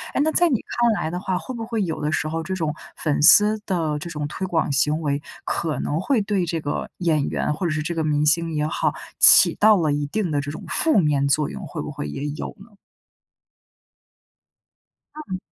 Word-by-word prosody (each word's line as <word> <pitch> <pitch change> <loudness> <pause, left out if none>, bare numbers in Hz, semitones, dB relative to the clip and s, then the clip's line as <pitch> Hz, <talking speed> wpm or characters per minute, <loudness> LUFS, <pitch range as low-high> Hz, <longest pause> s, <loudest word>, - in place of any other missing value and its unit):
哎， - - +2
那 315 - +1
在 350 +2 +3
你 270 - +2 0.2
看 240 -1 +4
来 160 -6 -2
的 180 - -3
话， 185 -1 -2
会 260 - -7
不 230 -2 -5
会 225 -3 -1
有 160 -4 -4
的 150 +1 -1
时 155 - -1
候 165 +1 -3
这 190 +4 -4
种 160 -4 -2 0.2
粉 150 -3 -1
丝 210 +7 +6
的 165 -6 -1
这 170 - -7
种 150 -3 -4
推 185 +5 -5
广 165 -4 0
行 150 +3 +1
为， 145 -2 -1 0.2
可 160 -3 -2
能 150 - -2
会 260 +4 +1
对 200 -3 0
这 165 0 -2
个 145 -1 -4
演 160 -5 +1
员 - - -1
或 165 +5 -4
者 - - -1
是 155 0 -2
这 170 - -3
个 165 -1 -2
明 150 -1 +1
星 165 +2 +2
也 150 0 0
好， 155 - -1 0.3
起 - - +8
到 215 0 +6
了 155 -5 +1
一 145 0 -2
定 190 +2 -2
的 145 -1 0
这 145 - -6
种 160 +7 -9
负 310 - +1
面 145 -4 +1
作 140 +2 +1
用， - - -7
会 - - -7
不 - - -6
会 75 - -6
也 105 - -5
有 145 - -5
呢？ 205 +4 -16 2.4
嗯。 295 -12 -6
160 Hz, 240 characters per minute, -22 LUFS, 150-190 Hz, 2.4 s, 起